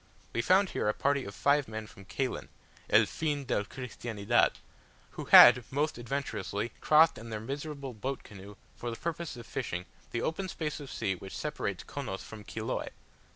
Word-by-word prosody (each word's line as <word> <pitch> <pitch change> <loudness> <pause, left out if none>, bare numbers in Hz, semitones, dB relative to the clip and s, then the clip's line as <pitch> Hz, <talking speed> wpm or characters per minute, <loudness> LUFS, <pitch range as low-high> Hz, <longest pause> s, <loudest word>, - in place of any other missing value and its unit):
We 115 - +1
found 190 +8 +4
here - - 0
a 105 - 0
party 140 -1 +1
of 100 - -8
five 145 0 +3
men 110 0 -5
from 100 -2 -14
Caylen, 125 +7 -3 0.4
"el - - +6
fin 145 -3 -2
del 105 -5 0
Cristiandad," 120 -2 0 0.6
who - - -7
had 125 - +10
most 145 0 -1
adventurously 120 -4 -3
crossed 155 -2 +5
in 115 +1 -9
their 110 -1 -3
miserable 140 +2 -5
boat 130 +4 -4
canoe, 100 0 -11 0.2
for 120 - -5
the 115 - -4
purpose 170 -2 -4
of 120 - -9
fishing, 90 -9 -4 0.2
the 115 - -2
open 185 +4 -2
space 155 -3 -3
of 140 -2 -8
sea 100 -4 -1
which 95 +1 -8
separates - - -3
Chonos 95 0 -5
from 110 -1 -10
Chiloe. 110 +1 -3
120 Hz, 175 wpm, -30 LUFS, 105-145 Hz, 0.6 s, had